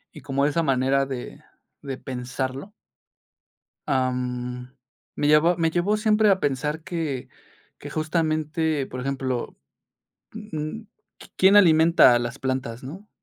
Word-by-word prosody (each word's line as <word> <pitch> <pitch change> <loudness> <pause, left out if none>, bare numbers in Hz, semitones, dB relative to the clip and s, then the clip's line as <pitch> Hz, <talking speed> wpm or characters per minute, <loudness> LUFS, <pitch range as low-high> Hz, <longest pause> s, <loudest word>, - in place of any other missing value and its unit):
y - - -10
como 140 0 0
esa 150 +3 +1
manera 135 -1 +2
de 130 -2 -7 0.4
de 135 -2 -6
pensarlo 130 +6 -5 1.2
ah, 130 -1 +1
mm, 125 0 -4 0.5
me 145 - 0
llevó 150 +4 +5
me 165 -1 +1
llevó 180 +5 +1
siempre 215 0 +3
a 190 -1 +3
pensar 150 +3 -2
que 155 -8 -4 0.5
que - - -8
justamente, 155 -2 -1
por 130 - -7
ejemplo, 130 -2 -3 0.8
mm, 210 -2 -6 0.4
qui - - -14
quién 195 +2 +5
alimenta 165 -7 +6
a - - +3
las 120 -1 -4
plantas, 130 -3 -3
¿no? 180 +11 -10
145 Hz, 130 wpm, -24 LUFS, 130-165 Hz, 1.2 s, alimenta